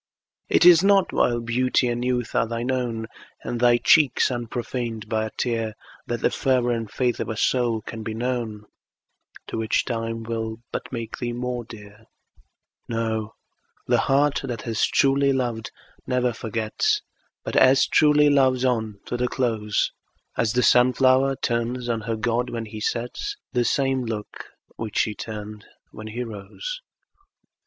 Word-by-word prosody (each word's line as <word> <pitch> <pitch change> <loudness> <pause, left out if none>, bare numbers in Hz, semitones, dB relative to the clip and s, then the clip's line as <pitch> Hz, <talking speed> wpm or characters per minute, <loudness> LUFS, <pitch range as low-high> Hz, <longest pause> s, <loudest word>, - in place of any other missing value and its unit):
It - - +4
is 175 0 +8
not 195 -1 +4
while 120 -1 +2
beauty 125 +2 +1
and 120 0 -1
youth 125 -2 -1
are 115 - +2
thine 120 +2 -2
own, 120 -3 -2 0.4
And 120 - -3
thy 120 0 +5
cheeks 135 0 +4
unprofaned 120 -2 -4
by 110 0 0
a - - -10
tear, 115 -3 -1 0.3
That 120 0 -3
the - - +2
fervor 125 -2 +1
and 115 -2 -2
faith 125 +1 -1
of - - -3
a 110 - -3
soul 120 -2 +1
can 115 - -7
be 110 0 -4
known, 115 -3 -3 0.8
To - - -5
which 110 0 +1
time 115 -2 -3
will 110 -1 -3
but - - -5
make 115 -3 -5
thee 120 -1 -2
more 125 0 -3
dear; 105 -1 -13 0.8
No, 110 -1 -2 0.5
the - - +2
heart 140 +1 +2
that 120 -3 -5
has 115 -2 +1
truly 140 0 +3
loved 120 -4 -2 0.4
never 125 -1 +1
forgets, 115 - -1 0.4
But - - -5
as 130 +1 +6
truly 150 -1 +4
loves 130 -2 +3
on 110 -5 -1
to 120 - -3
the 125 0 0
close, 110 -5 0 0.4
As 110 -1 +1
the 125 0 +2
sun 125 +1 +5
flower 130 +2 +3
turns 120 0 -2
on 115 -2 -1
her 115 +1 -2
god, 120 +3 -1
when 115 -1 -4
he 110 0 -8
sets, 125 - -3 0.2
The 120 -2 +2
same 135 -1 +1
look 110 -2 -6 0.3
which 110 -3 -5
she 110 - +2
turned 105 -1 -7 0.3
when 110 0 -9
he 120 +3 -4
rose. 115 - -7
120 Hz, 160 wpm, -24 LUFS, 110-125 Hz, 0.8 s, is